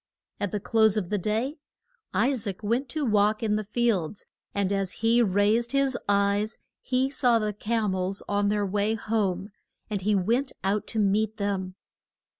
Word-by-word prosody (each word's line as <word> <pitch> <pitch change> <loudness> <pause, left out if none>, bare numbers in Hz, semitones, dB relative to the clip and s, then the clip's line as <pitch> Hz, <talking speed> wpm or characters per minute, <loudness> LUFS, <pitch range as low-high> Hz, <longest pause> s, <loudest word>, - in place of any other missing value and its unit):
At 205 - -1
the 205 - -2
close 220 0 +3
of 185 -5 -2
the 205 - +1
day 225 - -1 0.5
I 225 +8 +2
saac 210 -6 -4
went 235 +5 0
to 300 +3 -2
walk 210 -1 +2
in 210 -1 +1
the 215 - -1
fields, 210 -4 -1 0.3
and 200 -1 -1
as 195 -1 -1
he 230 +2 +3
raised 215 +4 +2
his 275 -2 +2
eyes 200 +2 +2 0.2
he 260 +1 0
saw 245 -4 +3
the 215 -1 -1
cam 210 -1 -1
els 190 +1 -2
on 205 0 +1
their 205 -1 +1
way 205 +3 0
home, 205 -3 -1 0.4
and 200 -2 -1
he 210 +2 +2
went 235 +8 +1
out 200 +2 0
to 220 - -1
meet 210 +1 +1
them. 190 -2 -2
210 Hz, 175 wpm, -26 LUFS, 200-230 Hz, 0.5 s, close